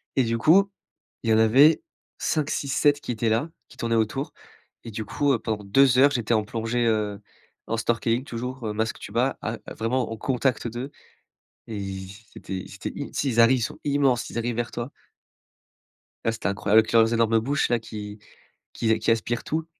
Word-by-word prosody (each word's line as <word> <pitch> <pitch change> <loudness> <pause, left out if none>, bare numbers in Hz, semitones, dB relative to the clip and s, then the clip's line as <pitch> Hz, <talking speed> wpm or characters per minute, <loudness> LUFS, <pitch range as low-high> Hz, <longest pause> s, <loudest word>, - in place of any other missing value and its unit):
Et 130 - +4
du 115 0 0
coup, 195 - +4 0.5
il 115 - -1
y - - +6
en - - +4
avait 135 +8 +6 0.4
5, 155 -2 0
6, 140 - -2
7 145 +1 +3
qui - - -4
étaient 115 0 0
là, 115 +9 +1 0.2
qui - - -17
tournaient 115 -1 0
autour. 115 +6 -1 0.5
Et 115 - -7
du 110 0 -5
coup 145 +6 0
heu, 115 - 0
pendant 110 -3 -3
2 125 +5 +4
heures, 140 +2 +6
j'étais 120 -4 0
en 110 - +2
plongée, 115 +2 -1
heu, 105 -2 0 0.5
en 115 +1 -1
snorkeling 115 +2 0
toujours, 125 +1 -5
heu, 105 - -2
masque, 110 +1 -2
tuba, 120 +5 -1
à 110 +1 -3
à - - -8
vraiment 115 +1 -1
en 115 - -5
contact 125 0 0
d'eux. 120 +5 -5 0.8
Et 110 -3 -5 0.5
c'était 95 -1 -6
c'était, - - -6
i - - -6
tu - - -4
sais, 140 - -1
ils 115 -2 0
arrivent, 125 +3 +5
ils - - -4
sont - - -5
immenses, 140 -4 +2
ils - - -7
arrivent 115 0 -1
vers 120 0 -2
toi. 120 +3 -5 1.3
Ah 115 - +2
c'était 115 - -5
incroyable 100 +2 +3
avec 110 - -4
leurs 115 0 +5
énormes 115 -1 +3
bouches, 140 +5 0
là, 120 - +2
qui 105 -1 -8 0.5
qui 115 - -1
a 110 - +3
qui - - 0
aspirent 115 +1 0
tout. 160 +1 -2
115 Hz, 205 wpm, -25 LUFS, 110-130 Hz, 1.3 s, y